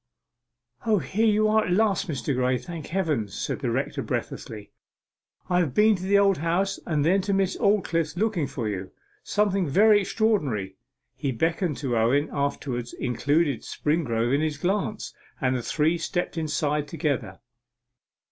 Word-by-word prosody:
'O, 215 -2 +4
here 195 +8 0
you 215 0 +3
are 215 0 +3
at - - -2
last, 200 -1 +2
Mr. 140 -3 -2
Graye, 125 0 +1
thank 165 +2 -8
Heaven!' 160 - -1
said 100 - -4
the - - -2
rector - - -2
breathlessly. 105 -2 -5 0.8
'I 180 -1 +2
have 160 -8 0
been 215 0 +5
to 180 - -7
the 195 +2 +3
Old 195 -3 +3
House, 180 +5 0
and 150 -3 +1
then 190 +4 +3
to 200 +1 -1
Miss 195 -1 +1
Aldclyffe's 170 -6 +1
looking 200 -7 0
for 130 -5 -4
you 95 -2 -4 0.3
something 200 -4 +1
very 205 +6 +5
extraordinary.' 150 - 0 0.4
He 140 -3 -2
beckoned 165 - 0
to 130 -5 -2
Owen, 125 +7 +2
afterwards 135 -4 -2
included 140 +2 0
Springrove 125 -6 -1
in 140 - +2
his 155 -2 -1
glance, 200 +6 -2 0.3
and 130 -3 +1
the 125 - -1
three 160 +6 +1
stepped 175 +2 -2
aside 150 -2 -1
together. 150 -4 -2
160 Hz, 155 wpm, -25 LUFS, 135-195 Hz, 0.8 s, been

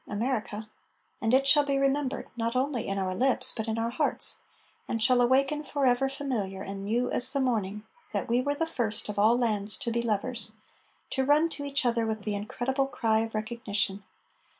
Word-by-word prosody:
America! 215 -1 -3 0.5
And 225 - +1
it 265 +2 +4
shall 290 +1 +6
be 280 -1 0
remembered 275 0 0
not 230 0 -2
only 255 -2 -1
in 195 - -2
our 190 -1 -1
lips 255 +7 +4
but 220 0 -4
in 220 0 -2
our 230 +1 -1
hearts 245 - 0 0.5
And 230 - -2
shall 250 0 +4
awaken 270 +4 +2
forever 270 -2 +1
familiar 225 -9 -4
and 195 0 -6
new 235 +5 -1
as 250 +1 +6
the 280 - -1
morning 210 -5 -1 0.3
That - - -2
we 240 +2 +2
were 285 +2 -1
the 325 +3 0
first 230 -10 -2
of 205 -1 -3
all 220 +4 +4
lands 210 -4 +2
To 235 - -3
be 235 +1 0
lovers, 225 0 -2 0.6
To 265 - 0
run 295 +4 +3
to 285 -3 -6
each 280 -1 -1
other 235 -2 +1
with 220 -1 -3
the 210 - -2
incredible 255 +6 -2
cry 225 -5 +1
Of 225 0 -3
recognition. 215 -3 -2
235 Hz, 195 wpm, -28 LUFS, 215-270 Hz, 0.6 s, shall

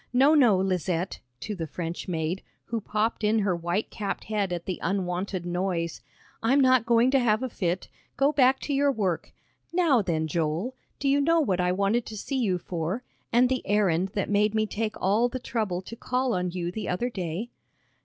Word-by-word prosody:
No, 270 +5 +5
no, 245 -10 +5
Lizette," 185 -1 -1 0.2
to 215 - -4
the 165 -5 -4
French 165 +2 -5
maid, 170 +1 -2 0.2
who 230 -1 -3
popped 215 +2 -1
in 215 +1 +3
her 200 -4 +1
white 175 +5 -2
capped 205 -2 -3
head 205 -3 -1
at 175 -1 -3
the 185 - -3
unwonted 185 0 -2
noise, 175 -1 -2 0.4
"I'm 260 +5 +3
not 255 -3 +4
going 235 +2 +4
to 270 - +4
have 230 -1 +2
a 260 - -2
fit. 180 -4 -2 0.3
Go 275 +2 +4
back 265 -2 +4
to 290 - -2
your 280 +1 +3
work. 190 -9 -1 0.4
Now 335 -9 +3
then, 160 -5 -1
Joel, 165 - -1 0.2
do 280 - -2
you 280 +1 +4
know 330 +3 +4
what 190 - +1
I 180 0 +2
wanted 200 +5 +1
to 215 - -7
see 265 +6 -2
you 195 -7 +1
for, 175 +6 -3 0.3
and 245 +2 +5
the 260 0 0
errand 190 -3 +2
that 200 - 0
made 210 +1 +2
me 215 0 +2
take 215 0 -3
all 215 +6 +2
the 255 - -4
trouble 215 -7 -2
to 230 - -8
call 250 +1 -1
on 180 -1 0
you 175 -1 -3
the 215 +3 -4
other 240 +8 -1
day?" 185 +4 -4
205 Hz, 200 wpm, -27 LUFS, 180-245 Hz, 0.4 s, No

